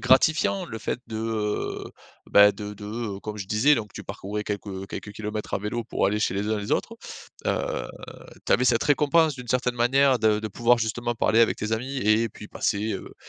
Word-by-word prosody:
gratifiant. 160 +7 +3
Le 115 - -6
fait 120 - -3
de, 110 - -6 0.7
heu, - - -11 0.4
bah, 100 0 +7
de 105 +1 -7
de, 105 - -10 0.3
heu, 100 - -10
comme 105 0 -6
je 95 - -5
disais 115 +9 +4
donc 105 -6 -5
tu - - -8
parcourais 105 +2 -5
quelques, 100 0 -4
heu, 95 -1 -6
quelques 105 - -7
kilomètres 105 0 -4
à - - 0
vélo 105 +4 -3
pour 115 - -2
aller 105 +2 +1
chez 95 - +1
les 100 +2 -1
uns, 110 -1 0
les 105 - -3
autres. - - -1 0.5
Heu, - - -1 0.6
tu - - +3
avais 125 - +4
cette 120 -2 +3
récompense 150 +2 +3
d'une 125 -2 -10
certaine 125 -1 0
manière 130 +2 +4
de 110 -1 +2
de 110 - -4
pouvoir 120 +4 +3
justement 120 +1 -2
parler 115 0 +3
avec 115 - +4
tes 110 +1 -3
amis 125 +5 -2
et 110 0 +3
puis 105 0 -12
passer, 105 +2 -1
heu, 95 - -7
110 Hz, 215 wpm, -25 LUFS, 105-125 Hz, 0.7 s, bah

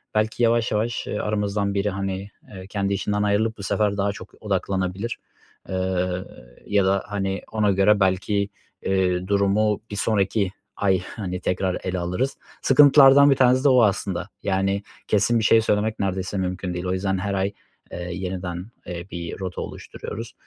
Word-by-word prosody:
belki 110 +2 +1
yavaş 115 0 +3
yavaş, 115 +3 -1
ııı, - - -3
aramızdan 105 -1 -1
biri, 100 +1 0
hani, 95 0 -4 0.2
eee, 95 -2 -10
kendi 100 -1 -1
işinden 105 +1 -1
ayrılıp 110 +2 +1
bu - - -6
sefer 100 0 0
daha 100 0 +1
çok - - -11
odaklanabilir. 95 +1 -2 0.5
Iıı, 95 -1 -1 0.4
ya 100 -2 +3
da, 95 0 +2
hani, 100 -2 -2
ona 105 -2 +2
göre 100 +2 +4
belki, 95 +2 +1 0.3
eee, 95 -1 +1
durumu 100 +1 +2
bir - - -4
sonraki 100 -2 +1 0.3
ay, 95 -3 +2 0.2
hani, 90 -3 -3
tekrar 90 0 0
ele 95 -1 -2
alırız. 90 +11 -2 0.2
Sıkıntılardan 140 0 +7
1 - - +5
tanesi 130 0 +4
de 145 - +5
o 125 -2 +6
aslında, 95 -3 0
yani, 95 +1 0 0.2
kesin 110 +3 +3
bir 110 - -1
şey 110 +1 +5
söylemek 110 0 0
neredeyse 95 0 -2
mümkün 90 -1 -2
değil. 90 +1 -4
O 90 - 0
yüzden 95 0 0
her 100 +2 -2
ay, 100 +1 0 0.4
eee, 90 0 -5
yeniden, 90 +1 -5 0.2
eee, 85 0 -5
bir 85 +1 -6
rota 95 -1 -4
oluşturuyoruz, 115 +1 -7
100 Hz, 165 wpm, -23 LUFS, 95-105 Hz, 0.5 s, Sıkıntılardan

